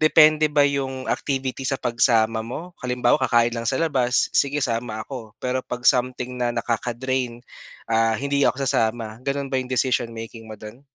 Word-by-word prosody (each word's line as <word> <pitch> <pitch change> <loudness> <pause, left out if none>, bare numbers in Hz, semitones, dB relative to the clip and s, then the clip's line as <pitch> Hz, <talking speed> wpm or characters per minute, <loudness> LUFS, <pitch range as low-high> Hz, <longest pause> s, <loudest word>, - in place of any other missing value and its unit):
depende 155 0 +5
ba 145 -1 +3
yung 135 -2 -1
activity 135 -1 -2
sa 135 - 0
pagsama 115 -2 +2
mo? 160 +10 -7
Halimbawa, 125 0 +1
kakain 120 -2 +3
lang 115 -1 -3
sa 130 - +1
labas, 130 -7 +1
sige 140 0 +2
sama 115 -2 -3
ako. 115 -6 -9
Pero 130 +1 -2
'pag 125 -1 -7
something 125 0 +2
na 120 - +1
nakaka-drain, 120 +1 -2 0.5
ah, 115 0 +3
hindi 140 +2 -1
ako 135 +1 -1
sasama. 110 -2 -1
Gano'n 140 0 -3
ba 130 - +2
yung 125 - -7
decision 125 -2 +1
making 115 0 -9
mo 110 - -8
do'n? 110 +5 -11
125 Hz, 170 wpm, -23 LUFS, 115-135 Hz, 0.5 s, depende